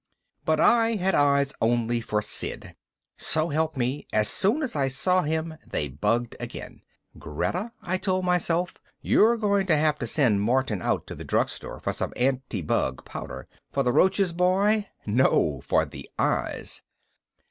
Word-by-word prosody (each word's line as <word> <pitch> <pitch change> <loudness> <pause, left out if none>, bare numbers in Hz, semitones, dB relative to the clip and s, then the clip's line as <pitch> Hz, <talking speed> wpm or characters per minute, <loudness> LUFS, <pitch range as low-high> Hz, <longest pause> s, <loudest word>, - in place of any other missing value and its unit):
But 155 -1 +2
I 230 -1 +4
had 190 -1 0
eyes 140 0 +3
only 120 0 +1
for 105 -2 -1
Sid. 105 - -3 0.4
So 155 +1 +1
help 160 0 -1
me, 130 +3 -2
as 105 0 +2
soon 225 +11 +2
as 260 - -3
I 140 -2 +1
saw 180 +8 +2
him 160 0 -2
they 75 - -3
bugged 115 - -1
again. - - -8 0.4
Greta, 180 - -3
I 185 +1 -1
told 185 -1 0
myself, 180 0 +1 0.3
you're 230 +3 +4
going 200 -3 +1
to 165 - +4
have 150 0 +1
to 120 - -3
send 115 -6 +2
Martin 120 -3 0
out - - -1
to - - -8
the - - -8
drugstore - - -2
for - - -2
some - - -3
anti 125 -6 -1
bug 65 -3 -1
powder. - - -7 0.2
"For 140 - 0
the 125 -1 +1
roaches, 190 +1 +3
boy?" 195 +4 +2 0.2
"_No, 120 +6 +2
for - - +2
the - - -11
eyes. - - -1
155 Hz, 160 wpm, -26 LUFS, 120-185 Hz, 0.4 s, I